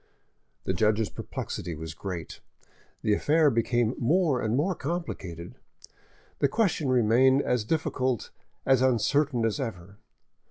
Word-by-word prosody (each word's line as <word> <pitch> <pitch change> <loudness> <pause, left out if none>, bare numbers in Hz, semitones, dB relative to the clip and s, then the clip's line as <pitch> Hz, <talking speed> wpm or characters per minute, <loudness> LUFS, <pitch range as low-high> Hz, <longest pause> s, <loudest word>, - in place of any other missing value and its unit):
The 95 - -1
judge's 105 +3 +1
perplexity 85 - -5
was 80 0 -7
great: 90 0 -6 0.6
the 105 - +2
affair 150 +6 +3
became 115 0 +1
more 150 0 +2
and 110 +1 0
more 175 +7 +1
complicated, 130 - -5 0.9
the 140 - +3
question 165 - 0
remained 130 +3 +4
as 125 -3 0
difficult, 130 -2 -1 0.3
as 135 -2 +4
uncertain 130 0 +2
as 110 +3 -1
ever. 100 -5 -6
120 Hz, 120 wpm, -27 LUFS, 105-140 Hz, 0.9 s, remained